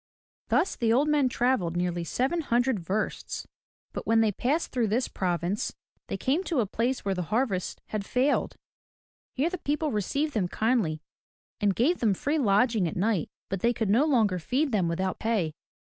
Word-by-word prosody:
Thus 385 Hz, -, +2 dB
the 230 Hz, -3 st, +1 dB
old 270 Hz, +6 st, +3 dB
men 295 Hz, -4 st, +3 dB
traveled 235 Hz, -10 st, +1 dB
nearly 175 Hz, -1 st, -1 dB
seven 265 Hz, -, 0 dB
hundred 245 Hz, -4 st, +1 dB
versts. 195 Hz, +5 st, -3 dB, 0.5 s
But -, -, -5 dB
when 225 Hz, 0 st, +4 dB
they 220 Hz, -1 st, +3 dB
passed 280 Hz, -, -1 dB
through 240 Hz, -3 st, +1 dB
this 230 Hz, +5 st, +1 dB
province 180 Hz, +2 st, -2 dB, 0.3 s
they -, -, -3 dB
came 290 Hz, +8 st, 0 dB
to 320 Hz, -7 st, 0 dB
a 230 Hz, -, +2 dB
place 235 Hz, +5 st, -1 dB
where 195 Hz, -, +1 dB
the 180 Hz, -, -2 dB
harvest 215 Hz, -6 st, -1 dB
had 215 Hz, -2 st, -2 dB
failed. 260 Hz, +7 st, +1 dB, 0.8 s
Here 300 Hz, +6 st, +1 dB
the 365 Hz, -, -4 dB
people 300 Hz, +1 st, -1 dB
received 280 Hz, +9 st, -1 dB
them 200 Hz, -5 st, +1 dB
kindly 200 Hz, -8 st, 0 dB, 0.6 s
and 200 Hz, -2 st, +2 dB
gave 300 Hz, +10 st, +2 dB
them 215 Hz, -5 st, +2 dB
free 295 Hz, -, 0 dB
lodging 215 Hz, -3 st, +3 dB
at -, -, -4 dB
night 200 Hz, -3 st, +1 dB, 0.2 s
but 195 Hz, -, -3 dB
they 235 Hz, +5 st, +2 dB
could 220 Hz, -4 st, -1 dB
no 250 Hz, +8 st, +4 dB
longer 220 Hz, -, +2 dB
feed 265 Hz, -, 0 dB
them 195 Hz, -6 st, +2 dB
without 185 Hz, +3 st, -2 dB
pay. 210 Hz, -9 st, 0 dB
225 Hz, 180 wpm, -27 LUFS, 190-265 Hz, 0.8 s, when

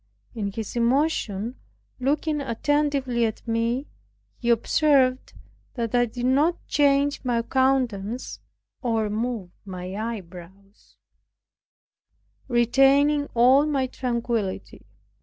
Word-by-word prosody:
In 205 Hz, -4 st, -3 dB
his 220 Hz, +2 st, -6 dB
emotion 240 Hz, -3 st, 0 dB, 0.4 s
looking 295 Hz, +3 st, 0 dB
attentively 275 Hz, -1 st, 0 dB
at 225 Hz, +1 st, -3 dB
me, 230 Hz, +4 st, 0 dB, 0.5 s
he 240 Hz, -, -2 dB
observed 260 Hz, +2 st, +2 dB, 0.4 s
that 235 Hz, -2 st, -3 dB
I 245 Hz, 0 st, +3 dB
did 240 Hz, +2 st, -5 dB
not 290 Hz, +7 st, +3 dB
change 285 Hz, 0 st, +2 dB
my 240 Hz, -2 st, 0 dB
countenance, 250 Hz, -4 st, 0 dB, 0.4 s
or 225 Hz, -4 st, 0 dB
move 220 Hz, -4 st, -3 dB
my 185 Hz, -2 st, -7 dB
eyebrows, 195 Hz, -2 st, -8 dB, 1.5 s
retaining 275 Hz, +4 st, +3 dB
all 260 Hz, +5 st, +5 dB
my 275 Hz, -3 st, 0 dB
tranquillity. 235 Hz, -6 st, -3 dB
245 Hz, 95 wpm, -24 LUFS, 225-275 Hz, 1.5 s, all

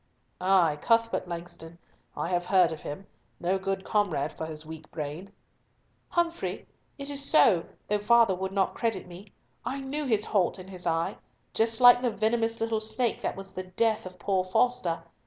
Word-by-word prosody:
"Ay, 180 Hz, -5 st, +3 dB
Cuthbert 230 Hz, -4 st, +2 dB
Langston. 170 Hz, -1 st, -8 dB, 0.4 s
I -, -, -2 dB
have 175 Hz, -1 st, 0 dB
heard 185 Hz, -3 st, +4 dB
of 160 Hz, -, -6 dB
him. 170 Hz, +7 st, -7 dB, 0.3 s
No 185 Hz, +2 st, 0 dB
good 195 Hz, 0 st, -2 dB
comrade 175 Hz, -10 st, 0 dB
for 160 Hz, -, -5 dB
his 155 Hz, -1 st, -6 dB
weak 160 Hz, -1 st, -10 dB
brain." 155 Hz, +5 st, -6 dB, 0.8 s
"Humfrey, 340 Hz, 0 st, -1 dB, 0.3 s
it 280 Hz, 0 st, -4 dB
is 280 Hz, 0 st, -3 dB
so, 205 Hz, -, +5 dB, 0.2 s
though 210 Hz, 0 st, +1 dB
father 230 Hz, -1 st, +5 dB
would 190 Hz, +1 st, -3 dB
not 195 Hz, -1 st, +1 dB
credit 230 Hz, -2 st, -1 dB
me. 180 Hz, +3 st, -11 dB, 0.4 s
I 275 Hz, -, -3 dB
knew 280 Hz, +2 st, -3 dB
his 215 Hz, -4 st, +1 dB
halt 195 Hz, -3 st, +1 dB
and 190 Hz, +1 st, -10 dB
his 180 Hz, -2 st, -7 dB
eye—just 220 Hz, +6 st, -1 dB
like 245 Hz, 0 st, +9 dB
the 250 Hz, -, +2 dB
venomous 225 Hz, +1 st, 0 dB
little 225 Hz, -1 st, 0 dB
snake 230 Hz, +2 st, -1 dB
that -, -, -2 dB
was 195 Hz, 0 st, -8 dB
the 185 Hz, -, -6 dB
death, 220 Hz, +2 st, 0 dB
of 185 Hz, 0 st, -12 dB
poor 190 Hz, +1 st, 0 dB
Foster. 185 Hz, -2 st, +1 dB
195 Hz, 175 wpm, -28 LUFS, 175-230 Hz, 0.8 s, like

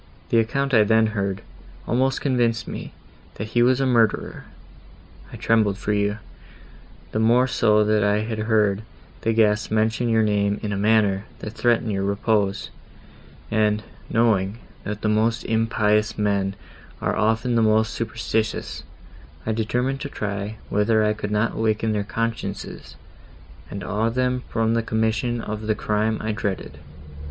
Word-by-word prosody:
The 115 Hz, -, +4 dB
account 135 Hz, +4 st, 0 dB
I 110 Hz, -3 st, +6 dB
then 110 Hz, +1 st, +4 dB
heard, 100 Hz, -2 st, -2 dB, 0.4 s
almost 130 Hz, +2 st, +1 dB
convinced 120 Hz, -4 st, +1 dB
me, -, -, -6 dB, 0.4 s
that 110 Hz, -, -5 dB
he 120 Hz, +1 st, +2 dB
was 125 Hz, +2 st, +4 dB
a 135 Hz, -, +2 dB
murderer. 115 Hz, -4 st, +1 dB, 0.9 s
I -, -, -8 dB
trembled 110 Hz, -3 st, +2 dB
for 105 Hz, +1 st, -1 dB
you;—the 105 Hz, +1 st, -6 dB
more 120 Hz, +3 st, +4 dB
so 105 Hz, -4 st, +3 dB
that 105 Hz, 0 st, +2 dB
I 105 Hz, +1 st, +2 dB
had 110 Hz, 0 st, -4 dB
heard 105 Hz, -2 st, +2 dB, 0.4 s
the 115 Hz, -, +1 dB
guests 105 Hz, -1 st, +2 dB
mention 110 Hz, +2 st, +1 dB
your 110 Hz, -1 st, +3 dB
name 105 Hz, -1 st, +1 dB
in 105 Hz, -1 st, -2 dB
a -, -, -1 dB
manner, 105 Hz, -1 st, +2 dB
that 105 Hz, -, -7 dB
threatened 115 Hz, -1 st, +1 dB
your 100 Hz, -1 st, -1 dB
repose; 100 Hz, 0 st, 0 dB, 0.8 s
and, 105 Hz, -1 st, +2 dB, 0.3 s
knowing, 110 Hz, -3 st, +2 dB, 0.3 s
that 105 Hz, +1 st, -4 dB
the -, -, +1 dB
most 110 Hz, +2 st, +1 dB
impious 110 Hz, -1 st, +1 dB
men 100 Hz, -2 st, 0 dB, 0.4 s
are -, -, -1 dB
often 110 Hz, +3 st, +1 dB
the 115 Hz, -, +3 dB
most 110 Hz, 0 st, +3 dB
superstitious, 110 Hz, -1 st, -2 dB, 0.6 s
I 110 Hz, -, 0 dB
determined 125 Hz, +5 st, -1 dB
to 140 Hz, -, -4 dB
try 105 Hz, -2 st, -4 dB
whether 110 Hz, +1 st, +2 dB
I 105 Hz, -, +2 dB
could 105 Hz, -1 st, -5 dB
not 105 Hz, +2 st, +1 dB
awaken 110 Hz, 0 st, 0 dB
their 105 Hz, -1 st, 0 dB
consciences, 110 Hz, -2 st, -4 dB, 0.7 s
and 100 Hz, -, -6 dB
awe 110 Hz, +2 st, 0 dB
them 125 Hz, +1 st, 0 dB
from 115 Hz, 0 st, +1 dB
the 115 Hz, -, +2 dB
commission 110 Hz, +2 st, 0 dB
of 110 Hz, 0 st, -5 dB
the 110 Hz, -, +2 dB
crime 105 Hz, +1 st, 0 dB
I 110 Hz, -, -2 dB
dreaded. 100 Hz, -3 st, -4 dB
110 Hz, 150 wpm, -23 LUFS, 105-115 Hz, 0.9 s, I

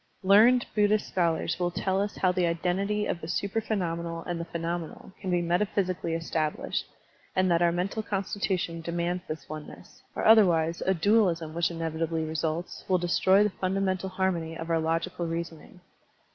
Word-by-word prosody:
Learned 225 Hz, +6 st, +6 dB
Buddhist 210 Hz, 0 st, +2 dB
scholars 170 Hz, -2 st, 0 dB
will 175 Hz, -1 st, +1 dB
tell 190 Hz, +2 st, -1 dB
us 205 Hz, 0 st, -3 dB
how 185 Hz, -, +3 dB
the 180 Hz, -1 st, +1 dB
identity 190 Hz, +5 st, 0 dB
of 170 Hz, -, -3 dB
the 160 Hz, -, -6 dB
supra 200 Hz, +5 st, -1 dB
phenomenal 170 Hz, -6 st, -3 dB
and 175 Hz, -1 st, -4 dB
the 170 Hz, -, -4 dB
phenomenal 170 Hz, +1 st, -5 dB
can 190 Hz, -, -4 dB
be 175 Hz, -1 st, +1 dB
meta 175 Hz, +4 st, +1 dB
physically 185 Hz, -4 st, -1 dB
established, 160 Hz, -2 st, -2 dB, 0.5 s
and 185 Hz, -1 st, +2 dB
that 170 Hz, 0 st, +3 dB
our 170 Hz, -1 st, +4 dB
mental 185 Hz, +5 st, -2 dB
con 200 Hz, -2 st, -2 dB
stitution 185 Hz, -4 st, -2 dB
demands 170 Hz, +2 st, -2 dB
this 155 Hz, -3 st, -6 dB
oneness, 155 Hz, 0 st, -10 dB
or, -, -, -2 dB
otherwise, 170 Hz, -7 st, +5 dB
a 190 Hz, -, +3 dB
dualism, 170 Hz, -4 st, +2 dB
which 170 Hz, 0 st, +1 dB
inevitably 165 Hz, -1 st, -2 dB
results, 160 Hz, +2 st, -3 dB
will 185 Hz, -, +3 dB
destroy 185 Hz, +3 st, +3 dB
the 210 Hz, -, +1 dB
fundamental 190 Hz, 0 st, -1 dB
harmony 180 Hz, -4 st, -1 dB
of 165 Hz, +1 st, -5 dB
our 165 Hz, -, +3 dB
logical 165 Hz, +2 st, -1 dB
reason 165 Hz, -1 st, -4 dB
ing. 180 Hz, -, -17 dB
175 Hz, 175 wpm, -28 LUFS, 165-190 Hz, 0.5 s, Learned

